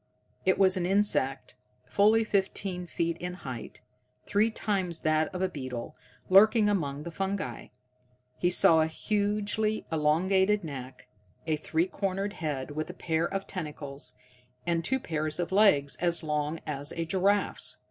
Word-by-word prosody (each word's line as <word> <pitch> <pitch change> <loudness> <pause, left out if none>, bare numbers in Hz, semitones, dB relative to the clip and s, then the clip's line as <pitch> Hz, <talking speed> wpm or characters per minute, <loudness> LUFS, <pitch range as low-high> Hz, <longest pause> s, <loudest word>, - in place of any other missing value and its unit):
It 190 - +4
was 190 -1 +4
an 175 -1 0
insect 160 -11 0 0.3
fully 215 - +4
fifteen 190 -3 -1
feet 170 0 -1
in 180 0 -4
height, 130 -9 -8 0.4
three 210 +2 +2
times 190 -6 -1
that 155 0 +2
of 185 0 -3
a - - +3
beetle, 130 -4 -6 0.3
lurking 215 +3 +6
among 150 -8 -1
the 170 - -6
fungi. 190 -8 -3 0.7
He 175 - +2
saw 165 -2 +6
a 155 - +2
hugely 210 +4 -1
elongated 190 +6 +2
neck, 130 -4 -8 0.4
a 160 -1 +1
three 160 +2 0
cornered 195 +1 -2
head 145 -6 -4
with 155 +2 -4
a 180 - -7
pair 165 -1 -1
of 195 0 -3
tentacles, 150 -5 -7 0.5
and 170 -1 0
two 265 +10 +1
pairs 155 -5 -2
of 175 +1 -2
legs 190 -9 +4
as 170 -1 +1
long 150 +1 -2
as 145 0 -3
a 165 - -2
giraffe's. 195 +4 +1
175 Hz, 145 wpm, -29 LUFS, 150-195 Hz, 0.7 s, lurking